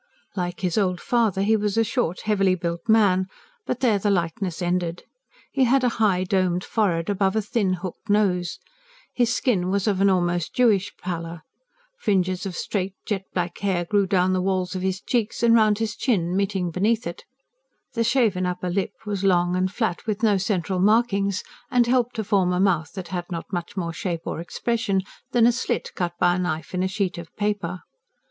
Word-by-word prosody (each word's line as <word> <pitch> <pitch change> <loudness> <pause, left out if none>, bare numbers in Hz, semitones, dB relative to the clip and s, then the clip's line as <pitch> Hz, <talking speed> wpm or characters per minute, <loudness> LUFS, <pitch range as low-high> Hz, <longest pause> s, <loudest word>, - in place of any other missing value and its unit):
Like 180 -2 -3
his 180 +1 +1
old 180 -3 0
father, 220 -5 +1
he 220 +2 +3
was 210 0 -1
a 225 - +5
short, 225 -5 -1
heavily 195 -3 +2
built 170 +2 -4
man; 195 -4 +4 0.4
but 250 - -2
there 225 -6 +3
the 205 - 0
likeness 175 -1 -1
ended. 175 -1 -1 0.5
He 265 -2 +3
had 260 +2 +3
a 250 - +4
high, 190 -4 +3
domed 180 -1 +1
forehead, 175 -7 0
above 195 0 +1
a 220 - +2
thin, 200 -3 0
hooked 185 +4 -7
nose. 185 -4 +1 0.6
His 240 -2 +2
skin 200 -8 +1
was 200 0 0
of 195 -2 +1
an 200 - +5
almost 175 -2 0
Jewish 205 -5 +3
pallor. 170 -2 -5 0.6
Fringes 185 -2 0
of 185 - -6
straight, 195 0 -2
jet 195 -3 -2
black 175 -1 -2
hair 185 -3 0
grew 200 +2 +2
down 185 0 +2
the 185 - +1
walls 185 -1 -1
of 185 - -3
his 190 0 -1
cheeks 235 0 -1
and 230 -1 +6
round 215 -2 +4
his 225 0 -2
chin, 180 -9 0
meeting 190 -3 0
beneath 215 +6 +1
it. 170 0 -6 0.7
The 230 - +1
shaven 220 -7 +2
upper 180 0 -3
lid 190 +1 0 0.2
was 200 -2 -3
long 175 -2 +3
and 185 +1 0
flat, 215 -3 -2
with 215 +1 -2
no 210 -3 +4
central 190 -2 -1
markings, 200 -1 +2 0.3
and 245 -1 +3
helped 245 0 +1
to 220 - -2
form 195 -3 +2
a 180 - 0
mouth 170 -6 +2
that 190 -3 -7
had 175 -1 -3
not 170 +1 -6
much 175 +3 -4
more 170 -2 -2
shape 170 -1 -4
or - - -3
expression 200 +2 -1 0.3
than 240 -2 +4
a 240 - +6
slit 240 - -2
cut 175 -1 -2
by 175 +1 +3
a - - -2
knife 165 -3 -3
in 180 - 0
a 185 - +1
sheet 190 -2 -2
of 170 - -10
paper. 205 -4 -2
190 Hz, 195 wpm, -24 LUFS, 180-215 Hz, 0.7 s, and